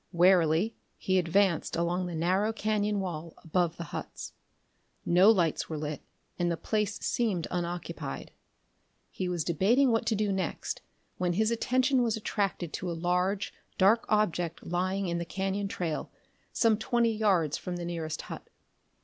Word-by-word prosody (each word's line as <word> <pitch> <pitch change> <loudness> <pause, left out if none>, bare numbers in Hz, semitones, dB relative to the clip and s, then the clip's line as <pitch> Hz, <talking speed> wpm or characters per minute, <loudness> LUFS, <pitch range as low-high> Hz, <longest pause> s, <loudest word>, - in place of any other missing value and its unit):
Warily 175 +2 +4 0.2
he 190 0 +2
advanced 180 0 +2
along 175 +2 0
the 175 - -5
narrow 185 +6 +2
cañon 210 -1 0
wall 170 -4 -4
above 170 0 0
the 170 - -4
huts. - - -6 0.7
No 180 +4 +6
lights 175 -8 +2
were 160 - -3
lit, 150 -1 -4 0.4
and 175 0 +2
the 170 - -1
place 210 +1 -1
seemed 205 -8 0
unoccupied. 175 0 -4 0.8
He 185 -1 -3
was 175 -3 -1
debating 225 - +3
what 225 - +1
to 225 - +2
do 210 -1 0
next 190 -1 -3 0.4
when 180 -1 +1
his 215 +5 +2
attention 255 +3 +2
was 230 -2 +1
attracted 195 -6 -2
to 185 - -3
a 170 - -3
large 180 +4 0 0.2
dark 205 +5 +4
object 175 -6 0
lying 185 +3 -1
in 170 0 -1
the - - -2
cañon 195 +3 -2
trail 170 -5 -3 0.4
some 225 -2 +3
twenty 235 -1 +1
yards 185 -8 +2
from 180 - -4
the 175 -1 -4
nearest 165 -2 -4
hut. - - -9
185 Hz, 155 wpm, -29 LUFS, 170-210 Hz, 0.8 s, No